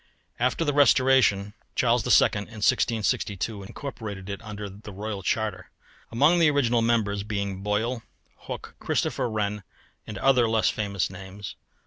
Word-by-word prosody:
After 125 +7 +1
the 145 - +1
restoration, 130 -7 +4 0.2
Charles 120 -1 +3
II. - - +6
in 100 - -1 0.3
1662 105 -2 0
incorporated 105 -3 -7
it 100 - -6
under 105 -2 -6 0.2
Royal 105 0 -5
Charter; 105 0 -2 0.4
among 145 +9 +4
the 165 -2 +5
original 120 -5 +2
members 110 -3 +1
being 100 -2 -3
Boyle, 110 +4 -1 0.5
Hooke, - - -6
Christopher 125 - -1
Wren, 105 -1 -2 0.5
and 105 - -6
other 125 0 +3
less 110 -1 +2
famous 100 -4 -2
names. 95 +1 -8
110 Hz, 130 wpm, -26 LUFS, 100-120 Hz, 0.5 s, II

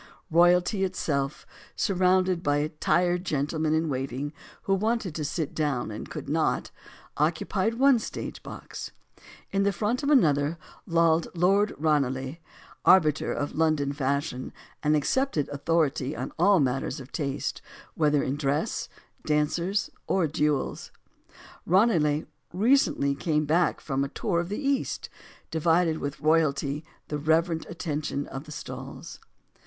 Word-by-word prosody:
Royalty 175 +4 +4
itself, 145 -7 -2 0.3
surrounded 185 -3 +2
by 145 -1 +1
tired 175 0 +2
gentlemen 155 -1 0
in 160 +1 +1
waiting 135 +1 -3 0.3
who 195 - +1
wanted 215 -2 0
to 155 - -3
sit 150 +1 -3
down 140 -7 -1
and 105 - -7
could - - -7
not, - - 0 0.5
oc 155 +3 +2
cupied 200 +6 -1
one 270 0 +5
stage - - -6
box. - - -8 0.6
In 195 - +1
the 200 0 +3
front 210 +7 -1
of 285 - -1
another, 155 - +3 0.3
lolled 165 -1 +3
Lord 195 +4 +3
Ranelagh, 135 -2 0 0.5
arbiter 155 -6 +4
of 145 - -3
London 155 -3 +1
fashion 140 -1 -2 0.3
and 150 0 +3
ac 150 - +1
cepted 260 - +1
authority 145 -1 0
on - - -4
all 195 +2 +5
matters 135 0 0
of 130 0 -11
taste 140 -4 -3 0.3
whether 150 -2 +2
in 135 +2 -2
dress, 145 +1 -1 0.4
dancers, 170 +6 0 0.2
or 190 -3 +2
duels. 150 -2 -1 0.8
Ranelagh, 165 -6 +3 0.3
recently 195 - +3
come 150 +1 0
back 165 +4 +2
from 135 -2 -1
a 140 - -3
tour 170 +3 -1
of 170 +1 -3
the 205 - -3
East, 275 -1 -1 0.4
divided 165 0 +2
with 140 +1 -5
royalty 150 -2 +1 0.3
the 150 - -2
reverent 160 +2 +1
attention 155 -4 -3
of 135 +3 -7
the 155 - -11
stalls. - - -8
160 Hz, 135 wpm, -27 LUFS, 145-180 Hz, 0.8 s, one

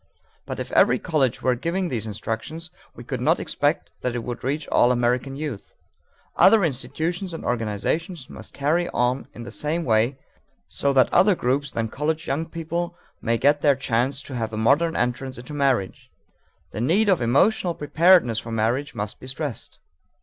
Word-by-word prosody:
But - - -5
if - - -5
every - - +5
college 140 -8 0
were 130 - +3
giving 170 +8 -2
this 110 -5 -3
instruction, 110 +8 -4 0.4
we - - -10
could - - -4
not - - +3
expect - - -1
that 125 -1 -2
it 120 - -3
would 120 0 -6
reach 145 +3 -2
all 120 - +4
American 125 +2 0
youth. 140 -8 -6 0.6
Other 220 -3 +6
institutions 165 +5 -2
and - - -8
organizations 125 - -2
must - - -11
carry 160 +5 0
on 125 +2 0
in 120 - -8
the 120 - -8
same 160 +3 -2
way, 115 +3 +2 0.5
so 140 - 0
that 130 -1 +4
other 190 +2 +5
groups 135 0 0
than 115 -4 -2
college 155 +6 -2
young 150 +4 -2
people 170 +1 -4 0.2
may 115 +1 +1
get 145 +4 +3
their 145 -2 +4
chance 130 +2 -1
to 135 - -8
have 115 -2 -2
a 110 - -5
modern 145 +9 +3
entrance 125 +2 -2
into 125 +5 -9
marriage. 135 -9 0 0.6
The 110 - -4
need 185 - +3
of 185 -8 +3
emotional 170 - +2
preparedness 150 -5 +4
for 115 - -8
marriage 115 +6 -1
must 105 0 -5
be 130 - -11
stressed. 135 -2 -4
135 Hz, 175 wpm, -24 LUFS, 120-160 Hz, 0.6 s, Other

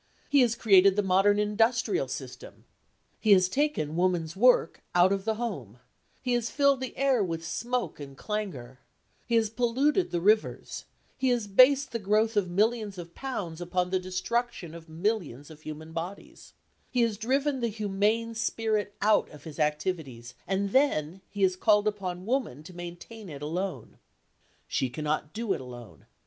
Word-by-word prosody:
He 285 -1 +6
has 240 -2 +3
created 195 -4 +5
the 205 - +1
modern 195 +2 +3
industrial 225 +4 +1
system; - - -8 0.5
he 215 -2 +5
has 185 -1 +5
taken 260 - -1
women's 175 -2 0
work 240 -5 +3
out 180 +2 +5
of 195 0 -1
the 220 -1 0
home; 165 - -5 0.5
he 250 -1 0
has 240 -1 0
filled 280 -2 +3
the 260 - -5
air 265 -5 +3
with 165 -2 -4
smoke 240 -3 -3
and 140 -2 -9
clangour; 150 - -5 0.5
he 235 - +1
has 220 -2 +2
polluted 265 +9 +1
the 175 - -1
rivers; 215 +5 +1 0.3
he 260 0 +2
has 240 -3 +1
based 260 +7 +5
the 230 - -2
growth 215 +2 +1
of 200 -3 +1
millions 210 +1 0
of 170 -1 -9
pounds 185 -11 -5
upon 180 +1 -1
the 185 - +2
destruction 185 0 -3
of 165 -1 -11
millions 160 - -2
of 155 -1 -14
human 155 +1 -8
bodies; 175 +4 -7 0.4
he 250 - +1
has 230 -2 0
driven 265 +6 0
the 235 - 0
humane 215 +2 0
spirit 220 -2 -1
out 215 0 +3
of 150 - -14
his 160 -1 -9
activities, 150 -6 -2
and 195 +1 -1
then 190 - +1
he 200 0 -3
has 185 -1 +3
called 210 +2 +3
upon 185 -3 -3
woman 230 - -2
to 180 - -12
maintain 175 +5 -9
it 145 -1 -8
alone. 170 - -4 0.7
She 130 - -1
cannot 150 +3 -2
do 225 -1 -1
it - - -5
alone. 120 - -11
200 Hz, 165 wpm, -28 LUFS, 170-230 Hz, 0.7 s, He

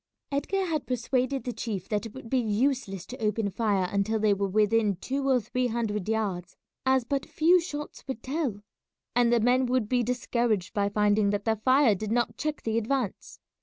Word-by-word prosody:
Edgar 380 +7 0
had 315 -5 -2
persuaded 255 +2 0
the 245 - -3
chief 210 -4 -4
that 210 +1 -1
it 220 - -14
would 260 -3 -9
be 260 +2 +1
useless 220 -3 0
to 255 - -9
open 210 -1 0
fire 200 -3 +1
until 200 +2 +1
they 215 -1 +3
were 200 0 -1
within 210 +1 +2
two 270 +9 -2
or 260 -2 +4
three 250 +2 -1
hundred 220 -4 -2
yards, 195 -6 -2 0.3
as 260 -1 +4
but 275 +2 -1
few 345 +3 +4
shots 295 -3 -6
would 265 - -5
tell, 265 -8 -2 0.5
and 240 -1 +4
the 240 - +4
men 250 +3 +3
would 250 -3 +1
be 250 +2 +2
discouraged 235 -4 -1
by 200 -1 +1
finding 210 0 +2
that 205 0 -1
their 220 -1 +1
fire 255 +1 +4
did 210 +2 -4
not 240 +1 +1
check 305 -1 -3
the 225 0 +1
advance. 235 -2 -3
230 Hz, 195 wpm, -27 LUFS, 210-260 Hz, 0.5 s, or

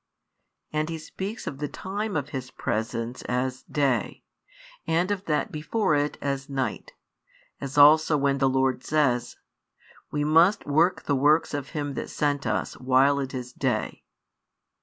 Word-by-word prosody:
And 155 +1 0
He 165 - -3
speaks 195 +7 -6
of 135 - -5
the 150 - -2
time 200 +6 -4
of 145 0 -3
His 130 -2 -5
presence 115 +1 -3
as 125 +1 -1
"day," 140 -5 -1 0.6
and 175 +4 +1
of 200 -1 -2
that 150 -2 0
before 155 +5 0
it 145 0 0
as 140 -1 -3
"night;" 135 -2 -3 0.7
as 140 +1 -6
also 150 +1 +7
when 140 -1 +1
the 135 -1 +3
Lord 130 0 +1
says: 140 -6 +1 0.7
We 145 0 -1
must 165 +7 +4
work 160 +6 +2
the 145 - 0
works 150 +5 +3
of 145 -2 -4
Him 145 -1 -2
that - - -5
sent 145 -2 -1
us, - - -1
while 130 +2 +3
it 135 -1 -4
is 125 -1 -6
day. - - -2
145 Hz, 155 wpm, -26 LUFS, 130-155 Hz, 0.7 s, also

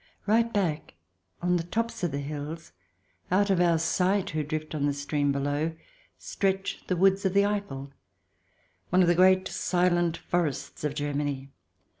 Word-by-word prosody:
Right 230 +3 +3
back, 175 - -1 0.5
on 180 0 +3
the 165 - -2
tops 230 +7 -3
of 175 - +2
the 140 - -3
hills, 150 +3 -6 0.6
out 200 +2 +3
of 180 -2 +3
our 170 -2 +4
sight 185 +4 +1
who 155 -1 -1
drift 155 +1 -4
on 145 -2 0
the 145 - 0
stream 145 0 0
below, 145 +3 -1 0.4
stretch 195 0 -2
the 185 - +1
woods 195 +2 +3
of 190 -1 0
the 200 0 +5
Eiffel, 140 -10 -3 1.0
one 185 +1 +4
of - - +2
the 175 - +5
great 185 +1 +4
silent 175 -2 +1
forests 170 -6 -2
of 150 -1 -1
Germany. 145 -2 -2
170 Hz, 160 wpm, -27 LUFS, 145-190 Hz, 1.0 s, the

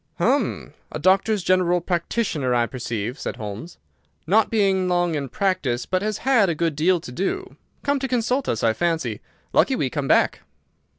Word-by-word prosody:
"Hum! - - 0 0.2
A - - -4
doctor's—general 185 0 +2
practitioner, 170 - -1
I 120 -1 +3
perceive," 120 -1 -4
said - - -4
Holmes. 105 - -7 0.5
"Not 210 +7 +3
been 195 -4 +2
long 175 -1 +1
in 140 -3 -3
practice, 185 - -1
but 185 0 -1
has 210 0 -2
had 240 -8 +4
a 165 - 0
good 165 -1 -1
deal 175 +4 +2
to 125 - -10
do. 285 - -3 0.3
Come 285 0 +1
to 265 - -2
consult 250 +2 0
us, 110 - -1
I 115 -1 +3
fancy! 160 -8 -1 0.3
Lucky - - +3
we - - -1
came - - -2
back!" - - +3
175 Hz, 170 wpm, -23 LUFS, 140-200 Hz, 0.5 s, had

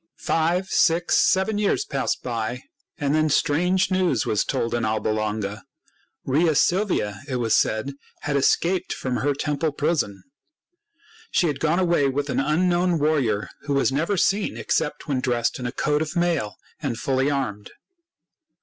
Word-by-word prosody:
Five, 170 +3 0
six, 175 -1 +2
seven 190 +3 +2
years 210 - +1
passed 135 -2 -2
by, 120 +1 -3 0.3
and 145 -1 0
then 155 0 +2
strange 180 +7 +2
news 180 - +1
was 105 - +1
told 115 - -2
in 120 -1 0
Alba 110 -1 0
Longa. 110 -1 -2 0.6
Rhea 155 +4 +2
Silvia, 175 - +1
it 130 - -3
was 115 -3 0
said, 110 +7 +1 0.3
had 145 -1 -2
escaped 175 +6 +1
from 125 -2 -3
her 140 +5 0
temple 150 +2 -1
prison. 145 - -1 1.1
She - - +2
had 145 -4 -1
gone 160 +2 +1
away 170 -6 +2
with 140 +1 -2
an - - 0
unknown 175 +4 +2
warrior 140 -9 +1 0.2
who 145 - 0
was 135 - +2
never 165 +9 0
seen 200 +3 +1
except 150 -2 -2
when 135 -3 0
dressed 120 -2 0
in 125 - -3
a - - -3
coat 150 +3 0
of 160 +2 -3
mail 170 -12 0 0.3
and 135 -7 -2
fully 135 +2 0
armed. 110 -8 -3
145 Hz, 160 wpm, -23 LUFS, 120-170 Hz, 1.1 s, six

